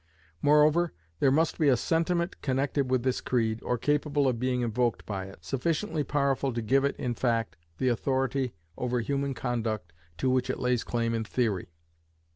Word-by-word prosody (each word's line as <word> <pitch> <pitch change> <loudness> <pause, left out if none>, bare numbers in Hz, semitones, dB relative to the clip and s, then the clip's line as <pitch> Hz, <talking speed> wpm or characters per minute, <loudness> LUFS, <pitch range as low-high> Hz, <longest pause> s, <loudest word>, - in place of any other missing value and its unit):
Moreover, 150 +3 +4 0.3
there 135 - +4
must 155 +4 +2
be 155 - +3
a 130 - +4
sentiment 170 - 0
connected 135 0 0
with 130 -2 +1
this 130 -1 0
creed, 115 -3 0
or 125 - -1
capable 145 +1 +1
of 125 -3 0
being 125 0 0
invoked 120 -2 0
by 95 -2 -4
it, 95 -4 -13
sufficiently 150 - -1
powerful 140 -1 +1
to 115 - -2
give 135 +5 +3
it 140 - +1
in 125 -2 -2
fact, 115 -2 0 0.2
the 130 - +1
authority 130 - 0 0.2
over 125 0 0
human 140 +2 -1
conduct 110 -8 -2 0.2
to 130 - -1
which 130 -1 +1
it - - -1
lays 125 -2 +1
claim 115 -1 -1
in 115 -1 0
theory. 110 -6 -1
130 Hz, 175 wpm, -28 LUFS, 115-140 Hz, 0.3 s, Moreover